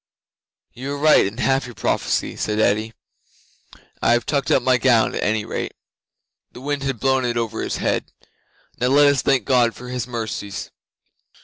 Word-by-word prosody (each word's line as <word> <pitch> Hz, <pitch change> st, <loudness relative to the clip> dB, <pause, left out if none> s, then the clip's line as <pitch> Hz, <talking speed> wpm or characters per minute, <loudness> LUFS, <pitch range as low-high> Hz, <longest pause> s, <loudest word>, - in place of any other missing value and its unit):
'"You 135 Hz, +3 st, -5 dB
are -, -, -4 dB
right 150 Hz, -7 st, +5 dB
in 105 Hz, +4 st, -8 dB
half 135 Hz, 0 st, +1 dB
your 120 Hz, -, -11 dB
prophecy," -, -, -1 dB
said 105 Hz, 0 st, -2 dB
Eddi. 110 Hz, +1 st, +1 dB, 1.1 s
"I -, -, +4 dB
have 120 Hz, -, +1 dB
tucked 140 Hz, -3 st, -1 dB
up 130 Hz, -, +3 dB
my 130 Hz, -1 st, +3 dB
gown, 115 Hz, -2 st, +3 dB
at -, -, -3 dB
any 110 Hz, 0 st, 0 dB
rate." -, -, -4 dB, 0.8 s
(The -, -, -10 dB
wind 145 Hz, +1 st, -2 dB
had 135 Hz, -4 st, -3 dB
blown 130 Hz, +2 st, +2 dB
it 120 Hz, -1 st, -1 dB
over 115 Hz, -1 st, -2 dB
his -, -, -2 dB
head.) -, -, -1 dB, 0.7 s
"Now 125 Hz, -, +1 dB
let 145 Hz, +3 st, +5 dB
us 140 Hz, -3 st, +3 dB
thank 135 Hz, -6 st, +1 dB
God 120 Hz, -4 st, +3 dB
for 125 Hz, +2 st, -10 dB
His 125 Hz, -1 st, -3 dB
mercies." 110 Hz, -4 st, -5 dB
125 Hz, 180 wpm, -21 LUFS, 115-135 Hz, 1.1 s, right